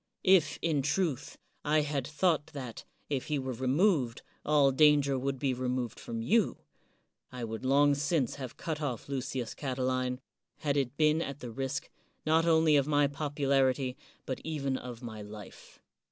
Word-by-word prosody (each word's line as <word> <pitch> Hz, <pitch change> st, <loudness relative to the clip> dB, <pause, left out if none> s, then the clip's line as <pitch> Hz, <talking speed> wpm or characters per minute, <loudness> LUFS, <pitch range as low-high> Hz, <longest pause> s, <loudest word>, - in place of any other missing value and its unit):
If, 185 Hz, -6 st, +5 dB
in 155 Hz, -4 st, +2 dB
truth, 145 Hz, -1 st, -1 dB, 0.3 s
I 150 Hz, +1 st, +3 dB
had 145 Hz, -3 st, -2 dB
thought 155 Hz, -1 st, +1 dB
that, 130 Hz, -5 st, -7 dB, 0.2 s
if 140 Hz, -3 st, -2 dB
he 150 Hz, -, 0 dB
were 130 Hz, -1 st, -3 dB
removed, 130 Hz, -, +1 dB, 0.2 s
all 145 Hz, -2 st, +4 dB
danger 145 Hz, -1 st, +5 dB
would 135 Hz, +1 st, -2 dB
be 135 Hz, 0 st, 0 dB
removed 125 Hz, -1 st, -2 dB
from 115 Hz, -1 st, -5 dB
you, 215 Hz, -, +2 dB, 0.7 s
I 125 Hz, -1 st, -6 dB
would 110 Hz, +1 st, -5 dB
long 140 Hz, +2 st, +4 dB
since 145 Hz, -2 st, 0 dB
have 130 Hz, -3 st, -7 dB
cut 160 Hz, -2 st, -3 dB
oflf 135 Hz, -7 st, -3 dB
Lucius 130 Hz, -3 st, -3 dB
Catiline, 130 Hz, -2 st, -1 dB, 0.4 s
had 145 Hz, -3 st, -1 dB
it 135 Hz, -1 st, -1 dB
been 155 Hz, +1 st, +3 dB
at 140 Hz, -3 st, -4 dB
the 120 Hz, -, -6 dB
risk, 135 Hz, +3 st, -3 dB, 0.4 s
not 160 Hz, +2 st, +3 dB
only 160 Hz, -2 st, +5 dB
of 140 Hz, 0 st, +2 dB
my 145 Hz, -1 st, +4 dB
popularity, 140 Hz, -2 st, +1 dB, 0.3 s
but 130 Hz, -, -4 dB
even 140 Hz, -4 st, -2 dB
of 125 Hz, -2 st, -7 dB
my 110 Hz, -3 st, -6 dB
life. 105 Hz, -1 st, -11 dB
140 Hz, 160 wpm, -31 LUFS, 130-150 Hz, 0.7 s, If